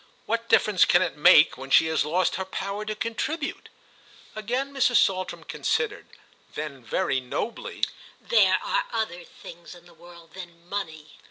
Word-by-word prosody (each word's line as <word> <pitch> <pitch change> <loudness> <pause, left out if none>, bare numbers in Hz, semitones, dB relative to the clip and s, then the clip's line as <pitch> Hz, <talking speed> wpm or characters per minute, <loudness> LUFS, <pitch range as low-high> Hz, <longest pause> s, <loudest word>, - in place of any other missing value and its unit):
What 230 +1 -2
difference 205 -4 +4
can - - +4
it - - -3
make 150 -3 +6
when 135 +1 -8
she 150 - +6
has 160 0 +1
lost 170 +5 0
her 190 - -2
power 195 +2 -5
to 215 0 -4
contribute?" 275 +8 -4 0.7
Again 250 +6 -3
Mrs. 255 -2 +2
Saltram 185 -4 +1
considered; 445 -2 -2 0.5
then 140 -4 -6
very 130 +3 -1
nobly: 235 - -5 0.4
"There 480 - +3
are - - 0
other 215 -7 -3
things 170 +1 -13
in 175 0 -17
the 175 - -18
world 170 0 -16
than 175 -2 -12
money." 160 -6 -6
185 Hz, 155 wpm, -25 LUFS, 165-230 Hz, 0.7 s, make